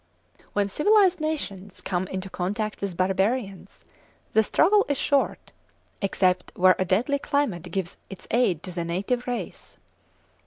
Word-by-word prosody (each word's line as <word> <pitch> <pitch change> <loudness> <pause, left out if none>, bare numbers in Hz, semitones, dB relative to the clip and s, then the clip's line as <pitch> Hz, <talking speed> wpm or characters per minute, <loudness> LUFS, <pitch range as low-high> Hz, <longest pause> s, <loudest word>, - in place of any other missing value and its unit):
When 205 -1 +1
civilised 380 - +3
nations 205 -12 -4
come 185 0 -2
into 190 +1 -5
contact 205 +4 -3
with 195 -4 -3
barbarians 195 +1 -1 0.5
the 220 - +5
struggle 400 - +4
is 285 - +1
short, 280 +1 0 0.5
except 185 -2 +1
where 185 0 +5
a 185 - +1
deadly 240 +10 +1
climate 280 - -1
gives 190 -3 -3
its 195 - -10
aid 195 -9 +2
to 185 - -6
the 170 -1 -3
native 200 +9 -2
race. 245 -1 -5
200 Hz, 140 wpm, -25 LUFS, 185-255 Hz, 0.5 s, the